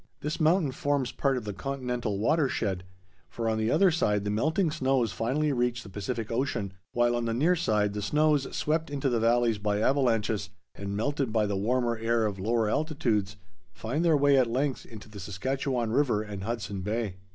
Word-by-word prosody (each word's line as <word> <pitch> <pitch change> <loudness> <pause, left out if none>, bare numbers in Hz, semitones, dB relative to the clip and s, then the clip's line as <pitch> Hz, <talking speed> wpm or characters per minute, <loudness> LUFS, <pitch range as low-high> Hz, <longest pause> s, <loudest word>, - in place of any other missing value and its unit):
This 150 +2 -3
mountain 160 -2 +3
forms 140 -1 -1
part 135 -2 0
of 125 - -4
the 105 -1 -4
continental 125 -2 -3
water 145 +7 +2
shed, 95 -6 -2 0.4
for 115 -1 -3
on 110 0 +1
the 110 +1 +1
other 180 +6 +4
side 105 -11 +1
the 105 - -1
melting 155 - +1
snows 130 -6 +1
finally 130 +10 0
reach 120 -1 0
the 105 - -11
Pacific 110 +3 -4
Ocean, 115 -6 -1 0.2
while 120 0 +2
on 120 -1 -1
the 115 -1 -1
near 165 +9 +3
side 105 - +1
the 105 - -3
snows 150 +4 +2
swept 160 +1 0
into 140 -1 -1
the 120 -2 +1
valleys 115 -1 +2
by 105 0 0
avalanches, 115 -5 +1 0.2
and 100 0 -5
melted 135 +1 -1
by 110 -1 +2
the 100 -1 -1
warmer 120 +3 0
air 115 0 +1
of 100 -3 -3
lower 110 +3 +1
altitudes, 110 -7 0 0.4
find 130 - -2
their 165 -3 +4
way 140 -1 +4
at 125 - +3
length 130 +3 -1
into 110 -2 -11
the 105 -2 -10
Saskatchewan 120 +5 -2
River 120 -5 +2
and 100 -2 -6
Hudson 105 -4 -3
Bay. 105 -1 -2
120 Hz, 195 wpm, -28 LUFS, 105-140 Hz, 0.4 s, other